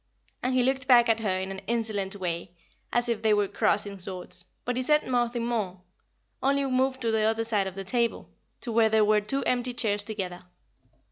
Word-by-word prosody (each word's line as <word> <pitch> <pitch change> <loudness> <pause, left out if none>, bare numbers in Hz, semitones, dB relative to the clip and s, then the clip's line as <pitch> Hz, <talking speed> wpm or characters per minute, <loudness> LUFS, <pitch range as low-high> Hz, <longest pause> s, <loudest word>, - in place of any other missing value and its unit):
and 255 +1 0
he 255 - +4
looked 260 0 0
back 240 -3 +7
at 225 0 +3
her 190 -4 0
in 190 +1 -4
an 190 0 -6
insolent 215 -4 -1
way, 175 -2 -3 0.4
as 240 0 +1
if 230 -2 -1
they 220 -1 +4
were 205 -1 +2
crossing 200 0 0
swords, 185 -1 -5 0.2
but 245 - -1
he 255 - 0
said 300 +4 +3
nothing 240 -2 0
more, 210 -6 -2 0.6
only 280 +1 +2
we 270 - -2
moved 260 +1 +1
to 230 -2 +1
the 220 -1 +2
other 220 +1 +2
side 210 -4 +1
of 190 - -7
the 195 - -5
table, 235 +4 -1 0.3
to 240 - -4
where 225 0 +4
there 220 -1 +4
were 210 0 +3
two 270 +7 -2
empty 250 0 0
chairs 210 -4 +1
together. 190 -4 -5
225 Hz, 210 wpm, -27 LUFS, 200-245 Hz, 0.6 s, back